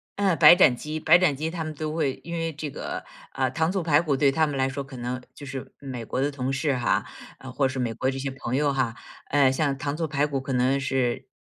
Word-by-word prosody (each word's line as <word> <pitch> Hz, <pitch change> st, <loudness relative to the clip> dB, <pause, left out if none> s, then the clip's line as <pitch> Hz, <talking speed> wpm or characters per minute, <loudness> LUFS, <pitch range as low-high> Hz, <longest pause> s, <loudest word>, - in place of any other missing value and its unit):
嗯， 195 Hz, -4 st, +1 dB
白 155 Hz, +2 st, +9 dB
斩 155 Hz, -9 st, +5 dB
鸡 155 Hz, +5 st, -5 dB
白 160 Hz, +3 st, +6 dB
斩 170 Hz, -6 st, +2 dB
鸡， 155 Hz, +3 st, -3 dB
他 165 Hz, -1 st, -4 dB
们 155 Hz, 0 st, -5 dB
都 155 Hz, +1 st, -4 dB
会 140 Hz, -5 st, -1 dB
因 170 Hz, -, -7 dB
为 165 Hz, 0 st, -2 dB
这 150 Hz, +1 st, -5 dB
个 -, -, -5 dB, 0.3 s
呃， 130 Hz, -1 st, 0 dB
糖 160 Hz, +4 st, 0 dB
醋 190 Hz, -2 st, -1 dB
排 155 Hz, -1 st, +3 dB
骨 150 Hz, -5 st, 0 dB
对 140 Hz, 0 st, +3 dB
他 155 Hz, +2 st, +2 dB
们 145 Hz, -, -3 dB
来 130 Hz, 0 st, +2 dB
说 140 Hz, +1 st, -4 dB
可 135 Hz, -1 st, -11 dB
能， 125 Hz, +1 st, -3 dB
就 145 Hz, -, -11 dB
是 135 Hz, -1 st, -7 dB
美 130 Hz, -4 st, -6 dB
国 130 Hz, -, -2 dB
的 145 Hz, -, +1 dB
同 135 Hz, -1 st, -3 dB
事 140 Hz, 0 st, 0 dB
哈， 120 Hz, -, +1 dB, 0.5 s
或 135 Hz, -2 st, +2 dB
是 130 Hz, 0 st, -4 dB
美 120 Hz, -2 st, -1 dB
国 130 Hz, +4 st, -1 dB
这 135 Hz, -, -5 dB
些 135 Hz, 0 st, -2 dB
朋 130 Hz, -2 st, -4 dB
友 145 Hz, +1 st, +2 dB
哈， 125 Hz, -3 st, -1 dB, 0.3 s
呃 140 Hz, -2 st, +4 dB
像 140 Hz, 0 st, 0 dB
糖 145 Hz, +1 st, -3 dB
醋 165 Hz, -2 st, -1 dB
排 145 Hz, 0 st, 0 dB
骨 140 Hz, -2 st, -2 dB
可 135 Hz, -1 st, -4 dB
能 130 Hz, +2 st, +2 dB
是 130 Hz, -3 st, -1 dB
140 Hz, 280 characters per minute, -25 LUFS, 130-155 Hz, 0.5 s, 白